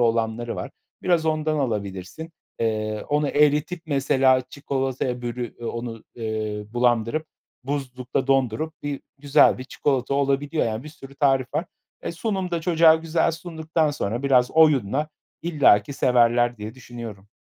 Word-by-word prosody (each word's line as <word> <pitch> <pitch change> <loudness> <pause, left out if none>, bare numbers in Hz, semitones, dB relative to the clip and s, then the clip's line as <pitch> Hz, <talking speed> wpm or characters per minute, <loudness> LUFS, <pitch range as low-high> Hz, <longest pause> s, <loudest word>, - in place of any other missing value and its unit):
olanları 115 0 0
var. - - -5 0.3
Biraz 170 -3 +2
ondan 155 -1 0
alabilirsin. 105 - -4 0.3
Eee, 110 -1 -1
onu 145 0 +1
eritip, 150 +4 +2
mesela, 135 -3 +3
çikolataya 130 -3 -2
bölü 120 -1 -4
eee, 120 - -9
onu, 115 -1 -5
eee, 110 -2 -3
bulandırıp 120 +5 +1 0.4
buzlukta 130 -2 -3
dondurup 135 +3 +1
bir 145 -1 -3 0.2
güzel 140 -2 +4
bir 130 - -6
çikolata 135 0 -1
olabiliyor 140 +2 +1
yani 110 +1 -3
bir - - -7
sürü 140 -3 -13
tarif 135 -2 +2
var. 170 - 0 0.4
E, - - -3
sunum 190 0 -2
da 170 -1 -1
çocuğa 165 -1 +5
güzel 160 +1 +1
sunduktan 160 -1 -1
sonra 115 -3 -3
biraz 130 -3 +3
oyunla, 150 -3 +3 0.3
illaki 140 -8 +4
severler 120 -1 +3
diye 105 +2 -7
düşünüyorum. 115 -6 -9
135 Hz, 140 wpm, -24 LUFS, 115-155 Hz, 0.4 s, çocuğa